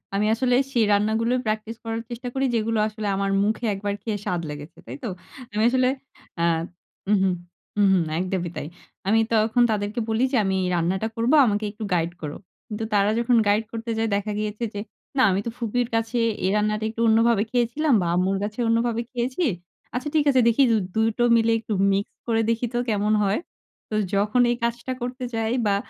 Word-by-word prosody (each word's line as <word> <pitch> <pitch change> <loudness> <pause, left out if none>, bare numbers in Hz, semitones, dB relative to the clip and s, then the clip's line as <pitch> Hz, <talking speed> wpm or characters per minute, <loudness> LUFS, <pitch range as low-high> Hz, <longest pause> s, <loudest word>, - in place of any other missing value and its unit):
আমি 205 +1 +1
আসলে 250 +2 +2 0.2
সেই 230 -3 +3
রান্নাগুলোই 220 +4 +1
প্র্যাকটিস 220 +1 -2
করার 225 0 -3
চেষ্টা 245 +1 -6
করি 270 0 0
যেগুলো 225 0 0
আসলে 215 -1 -5
আমার 195 0 0
মুখে 220 +3 -1
একবার 200 +1 -3
খেয়ে 220 -2 -2
স্বাদ 175 -1 -1
লেগেছে। 150 +1 -8
তাই - - -6
তো? - - -2 0.5
আমি 215 +1 +1
আসলে 255 0 +2 0.5
আ - - +2 0.6
হুম, 210 +1 +4
হুম, 190 -1 +2 0.4
হুম, 205 -1 +5
হুম 180 -3 +3 0.2
একদমই 185 -1 -2
তাই। - - -4 0.4
আমি 220 +3 +4
তখন 220 +2 +3
তাদেরকে 210 +2 -2
বলি 220 +2 +1
যে 265 - +2
আমি 190 0 +1 0.2
রান্নাটা 180 +5 0
করব, 230 +2 +1
আমাকে 210 -1 0
একটু 215 +2 -8
গাইড 170 -1 +1
করো। 150 -2 -5 0.3
কিন্তু 215 +1 -4
তারা 200 0 +4
যখন 240 +1 +2
গাইড 205 +2 +3
করতে 230 0 -4
যায় 225 0 +1
দেখা 205 +1 -2
গিয়েছে 210 +2 -3
যে, 205 - -4 0.4
"না - - +4
আমি 185 - +1
তো - - -1
ফুপির 240 +1 -1
কাছে 225 +2 -1 0.3
এই - - +3
রান্নাটা 210 0 0
একটু 230 +1 -5
অন্যভাবে 225 -1 +4
খেয়েছিলাম 250 +5 +1
বা 175 - -1
আম্মুর 185 +2 +1
কাছে 210 +3 -5
অন্যভাবে 230 0 +1
খেয়েছি। 255 +7 -2 0.5
আচ্ছা 255 +4 -2
ঠিক 300 -2 +3
আছে 260 -2 +4
দেখি 235 +4 +4
দ - - +4 0.2
২ 220 0 +3
টো 240 - +2
মিলে 230 0 +3
একটু 220 -1 -4 0.2
মিক্স 195 +1 -1
করে 225 -1 +2
দেখি 230 +1 0
তো - - 0
কেমন 210 0 +1
হয়?" 195 +1 +1 0.5
তো 215 - -3 0.2
যখন 210 +5 +2
এই - - +1
কাজটা 235 +2 -2
করতে 250 +1 -4
যাই 225 0 0
বা 200 -1 +3
220 Hz, 195 wpm, -24 LUFS, 205-235 Hz, 0.6 s, হুম